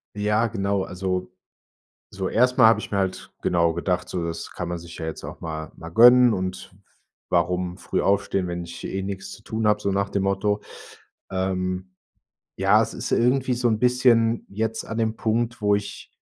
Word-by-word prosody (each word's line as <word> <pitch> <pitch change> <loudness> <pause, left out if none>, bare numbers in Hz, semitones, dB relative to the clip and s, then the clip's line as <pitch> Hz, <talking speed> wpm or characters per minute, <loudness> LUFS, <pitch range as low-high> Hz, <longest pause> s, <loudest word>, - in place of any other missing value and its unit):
Ja, 105 +2 +1
genau, 100 -3 -1
also 90 0 -3 0.8
so 95 -1 -3
erst 125 +2 +2
mal 120 -4 +8
habe 115 - +5
ich - - -7
mir 100 - -1
halt 95 -1 -3
genau 85 -1 +2
gedacht, 90 +1 -1
so, 90 - -3
das 85 0 -5
kann 90 -1 -5
man 85 - -3
sich 85 0 -11
ja 80 - -5
jetzt 80 - -6
auch - - -9
mal 80 -1 -5
mal 80 - -9
gönnen 120 +5 +7
und 95 -1 -4 0.6
warum 90 0 0
früh 95 - -2
aufstehen, 95 -1 +1
wenn 85 0 -4
ich 85 0 -9
eh 95 - -3
nix 95 0 -5
zu 110 - -14
tun 110 0 -1
habe, 105 0 +2
so 100 - 0
nach 100 +1 0
dem 100 -1 -1
Motto. 100 +2 0 0.7
Ähm, 95 0 -2 0.6
ja, 100 +3 +4
es 115 0 -2
ist - - -5
irgendwie 125 +2 +2
so 120 0 +1
'n 110 - +1
bisschen 120 -2 +3
jetzt 110 +2 -2
an 110 - -5
dem 110 -1 0
Punkt, 115 +1 -1
wo 105 0 +3
ich 100 0 -6
100 Hz, 190 wpm, -24 LUFS, 90-110 Hz, 0.8 s, mal